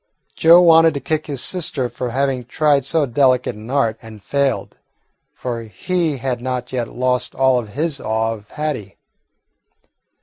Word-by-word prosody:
Joe 170 +2 +6
wanted 165 -2 +6
to - - -1
kick 155 +2 -2
his 140 -4 -3
sister 155 -8 -1
for 125 0 -5
having 130 0 -1
tried 145 +1 +1
so 155 +1 +2
delicate 125 -2 +2
an 110 +2 -11
art 115 -5 0
and 110 -1 -12
failed, 140 0 -1 0.5
for 120 -2 -5
he 155 - -2
had 125 -1 -3
not 125 0 -4
yet 120 -2 -1
lost 125 0 -1
all 130 -1 +3
of 105 -4 -9
his 155 -1 -1
awe 110 +1 -1
of 105 -2 -12
Hattie. 145 -10 -4
130 Hz, 160 wpm, -19 LUFS, 120-150 Hz, 0.5 s, Joe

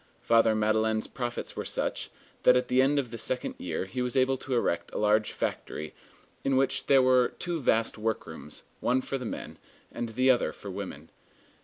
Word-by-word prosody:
Father 115 -1 +4
Madeleine's 110 0 +1
profits 120 -2 -5
were - - -3
such, - - -2 0.3
that 125 - +6
at 125 0 +1
the 125 +1 +4
end 140 +2 +3
of 130 -5 -1
the 115 - -6
second 125 +3 -2
year 85 +1 -3
he 95 +7 -4
was 125 +1 -1
able 130 +1 +3
to 130 0 -3
erect 85 -7 0
a - - -1
large 105 0 +2
factory, 75 0 -4 0.5
in 135 -1 +2
which 135 0 +1
there 135 -2 +6
were 130 -1 +4
two 175 -2 -3
vast 115 -4 +1
workrooms, 95 -9 -4 0.2
one 125 +2 +2
for 135 +1 -3
the 125 - -5
men, - - -6 0.3
and 120 - -4
the 130 +4 +4
other 125 - +1
for 100 - -8
women. 90 -6 -7
120 Hz, 190 wpm, -28 LUFS, 110-130 Hz, 0.5 s, that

